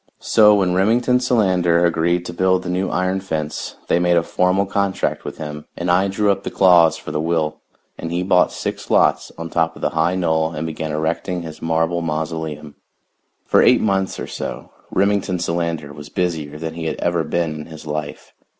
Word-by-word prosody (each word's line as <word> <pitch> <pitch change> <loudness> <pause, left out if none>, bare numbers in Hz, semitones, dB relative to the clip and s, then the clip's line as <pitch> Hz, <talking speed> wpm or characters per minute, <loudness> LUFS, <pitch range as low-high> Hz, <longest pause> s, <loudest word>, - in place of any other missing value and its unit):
So 105 -2 +5
when 95 -3 +1
Remington 120 +7 +3
Solander 90 -8 +2
agreed 85 +1 +1
to 85 - -6
build 95 +1 +2
the 90 - -3
new 95 +1 -1
iron 95 +1 0
fence 80 -5 -4
they - - +2
made 90 0 +3
a 85 - +3
formal 90 +3 +1
contract 100 0 -1
with - - -7
him, 75 -1 -7
and 85 0 0
I 95 +2 +3
drew 100 +1 +1
up 100 - -1
the - - -4
clause 85 -4 +5
for - - -8
the 75 - -1
will, 80 -1 -1 0.4
and 80 - -5
he 90 +1 -1
bought 90 -1 +3
six - - -5
lots - - +2
on 85 0 -6
top 80 -1 0
of - - -12
the - - +1
high 80 +3 +1
knoll 80 -2 0
and 80 -1 -4
began 80 -1 -4
erecting 85 +3 -2
his 80 -2 -9
marble 80 +1 0
mausoleum. 80 -2 -4 0.7
For - - +4
eight - - +5
months 95 -2 0
or - - -4
so - - -6 0.2
Remington 100 -1 +1
Solander 85 -4 -2
was 75 0 -10
busier 80 -5 -2
than 80 0 -5
he 80 0 -6
had 80 - -1
ever 85 -1 0
been 85 -1 -1
in 75 0 -7
his 80 -1 -11
life. 75 -1 -5
85 Hz, 195 wpm, -20 LUFS, 80-95 Hz, 0.7 s, So